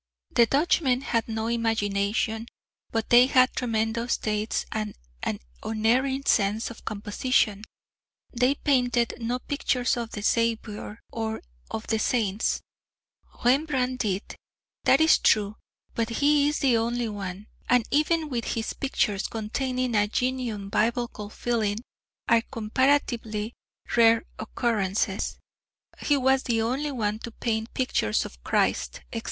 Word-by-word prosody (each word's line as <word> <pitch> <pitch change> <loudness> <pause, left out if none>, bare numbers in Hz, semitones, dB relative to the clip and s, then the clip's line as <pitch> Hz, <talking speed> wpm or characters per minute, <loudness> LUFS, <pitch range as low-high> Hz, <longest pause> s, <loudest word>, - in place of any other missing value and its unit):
The 235 -1 +5
Dutchmen 275 -2 +2
had 230 -4 -1
no 220 -1 -2
imagination, 225 -1 0 0.4
but 225 -1 -2
they 245 +1 +8
had 255 -1 +4
tremendous 230 0 0
taste 215 0 -1
and 215 -1 -3 0.3
an - - -2 0.2
unerring 255 +5 +1
sense 215 +2 +2
of 230 - -12
composition; 210 0 0 0.7
they 250 +3 +2
painted 245 -5 +1
no 240 +2 -1
pictures 250 -2 0
of 235 -1 -3
the 210 - -5
Saviour 225 -1 -1
or 220 -1 -3 0.3
of 220 - -5
the 220 -1 0
Saints.... 220 -2 0 0.8
Rembrandt 255 -1 +2
did! 200 -3 0 0.6
That 270 - +5
is 320 0 +6
true; 210 -1 +2 0.4
but 230 -1 -1
he 285 +4 +3
is 295 - 0
the 260 -5 +3
only 235 +1 0
one, 200 -2 -6 0.2
and 245 -2 +4
even 310 +2 +2
with 240 -5 -2
him 225 - 0 0.2
pictures 210 -7 0
containing 250 +3 -2
a 205 -1 +3
genuine 240 -4 -2
Biblical 225 -1 -1
feeling 215 -2 -1 0.5
are 230 -1 +5
comparatively 230 -2 0 0.4
rare 230 -1 +5 0.2
occurrences;{K} 215 -3 -1 0.7
he 290 - +3
was 265 0 +3
the 235 -3 0
only 260 +7 0
one 215 -4 -1
to 235 - -6
paint 225 -1 -2
pictures 180 - +1
of - - -11
Christ, - - 0
etc. - - -1
230 Hz, 130 wpm, -26 LUFS, 215-255 Hz, 0.8 s, they